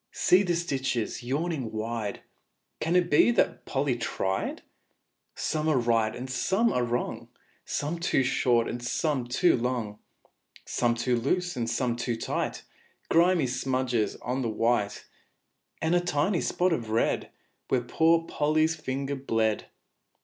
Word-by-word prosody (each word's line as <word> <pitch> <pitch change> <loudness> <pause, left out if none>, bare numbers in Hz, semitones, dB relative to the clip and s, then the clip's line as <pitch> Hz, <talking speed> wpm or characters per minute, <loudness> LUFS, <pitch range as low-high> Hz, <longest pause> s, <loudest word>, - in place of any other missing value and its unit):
See 180 +2 +4
the 175 -3 0
stitches 135 -9 -2
yawning 140 0 -2
wide 110 -1 -4 0.6
Can 165 +3 0
it 180 -1 +4
be 150 - +6
that - - +1
Polly 135 -2 0
tried? 95 -4 -2 0.7
Some 155 0 -1
are 150 - +3
right 115 -2 +1
and 125 +2 -6
some 190 - +1
are 125 - +1
wrong, 120 -1 -3 0.4
Some 155 +4 -2
too 165 -5 +2
short 120 -2 +2
and 120 - -4
some 130 +1 -1
too 150 +8 +3
long, 115 -4 -2 0.7
Some 120 -1 +1
too 120 +1 0
loose 175 +9 0
and 115 -2 -2
some 120 -1 0
too 120 0 -2
tight; 115 - -3 0.5
Grimy 170 -2 +4
smudges 130 -3 0
on 125 +3 -1
the 120 - -1
white, 110 -1 0 0.8
And 160 +1 +2
a 175 - +5
tiny 175 +1 +1
spot 180 -1 +1
of 115 -8 -3
red, 110 +1 0 0.4
Where 130 - +1
poor 165 +7 +2
Polly's 155 +2 +1
finger 140 -2 -3
bled. 115 -5 0
130 Hz, 140 wpm, -27 LUFS, 120-160 Hz, 0.8 s, be